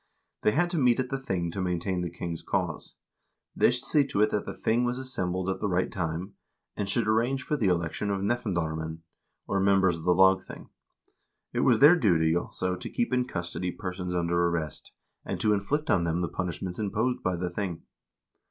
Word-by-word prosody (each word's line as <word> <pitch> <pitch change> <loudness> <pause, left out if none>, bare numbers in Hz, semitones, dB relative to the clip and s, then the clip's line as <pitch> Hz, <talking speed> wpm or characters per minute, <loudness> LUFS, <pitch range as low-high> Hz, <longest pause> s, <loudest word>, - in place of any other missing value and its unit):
They 105 - +3
had 175 +4 +2
to 170 - 0
meet 125 -2 +4
at 130 -1 -1
the 135 - -2
thing 95 -10 -2
to 95 - -4
main 90 -1 0
tain 90 0 -2
the 90 - -2
king's 85 -1 -5
cause; - - -3 0.6
they - - +5
should 125 +1 -1
see 145 +1 +3
to 105 - 0
it 105 - +2
that 105 - -1
the - - -4
thing 115 +2 +1
was 125 0 0
as 130 0 -6
sembled 90 0 -1
at 95 - -11
the 105 - -1
right 90 0 0
time, 85 +1 -3 0.4
and 100 -2 -3
should 110 +2 0
arrange 120 +5 +1
for 150 - -1
the 115 -9 +1
election 85 +3 0
of 100 -1 0
nefndarmenn, 80 -8 -2 0.4
or 100 - 0
members 95 -3 +3
of - - -10
the 90 0 +4
lagthing; 95 +1 +2 0.8
it - - -1
was - - +4
their 150 +5 +8
duty, 85 - +3
also, 90 +1 -2
to - - -7
keep 240 - -1
in 125 0 +2
custody 85 -2 -3
persons 90 0 -4
under 85 0 +2
arrest, 80 -4 -3 0.3
and - - -4
to 105 - +3
inflict 145 +10 0
on 85 - +3
them 85 +1 0
the 85 - 0
punishments 90 +2 -4
imposed 110 +4 0
by 90 - 0
the 90 0 -3
thing. 90 -3 -4
95 Hz, 210 wpm, -28 LUFS, 85-115 Hz, 0.8 s, their